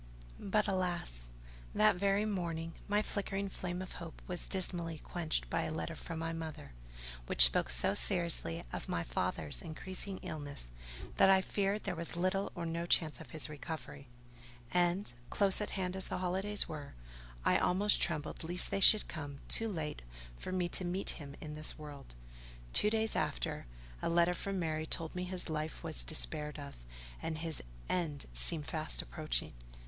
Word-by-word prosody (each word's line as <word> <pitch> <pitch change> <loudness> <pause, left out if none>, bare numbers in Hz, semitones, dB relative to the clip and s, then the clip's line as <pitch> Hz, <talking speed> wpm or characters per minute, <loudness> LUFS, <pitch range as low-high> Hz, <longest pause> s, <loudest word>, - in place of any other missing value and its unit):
But 210 +2 +1
alas! 175 - -2 0.5
that 215 -1 +5
very 200 +3 +2
morning, 165 -5 -2
my 205 +1 +2
flickering 200 -1 -2
flame 180 -1 -4
of 185 - -9
hope 165 -2 -8
was 180 -1 -3
dismally 175 -4 -2
quenched 160 +1 -1
by - - 0
a - - -2
letter 160 +1 -3
from 165 +1 -6
my 165 0 -2
mother, 160 - -6 0.6
which 60 - +8
spoke - - +2
so - - +4
seriously 170 - +2
of - - -5
my 85 - 0
father's 80 -5 -1
increasing 185 +4 -3
illness, 145 - -4 0.5
that - - +7
I 190 0 +7
feared 200 +2 0
there - - -1
was 170 +1 -4
little 185 +3 0
or 170 - -3
no 170 +1 -2
chance 160 -2 +2
of 150 - -11
his 155 +3 +1
recovery; 150 -2 -7 0.6
and, 180 -2 +1 0.2
close 200 0 +4
at 210 - -2
hand 185 -1 -1
as 190 - -2
the - - -3
holidays 190 +3 +1
were, 150 - -7 0.5
I - - +4
almost 205 +3 +3
trembled 155 -3 0
lest 175 +3 +3
they 195 - +1
should 215 +2 +7
come 145 -3 -6
too 225 - +6
late 160 -7 -4 0.3
for 120 - -6
me 185 -1 0
to 185 - -2
meet 180 +2 -1
him 140 -3 -8
in 150 -1 -7
this 155 0 -2
world. 145 - -10 0.6
Two 210 - +10
days 220 0 0
after, - - -2 0.3
a - - 0
letter 170 +1 +4
from 195 +2 -3
Mary 160 -2 -1
told 165 0 +2
me 180 0 -3
his 180 0 -2
life 155 0 -3
was 160 -2 -1
despaired 155 -1 -1
of, 140 -1 -7 0.5
and 160 -1 -3
his 160 0 -2 0.3
end 160 -6 -1
seemed 145 - +4
fast 155 +1 0
approaching. 155 -2 -2
170 Hz, 170 wpm, -34 LUFS, 155-190 Hz, 0.6 s, Two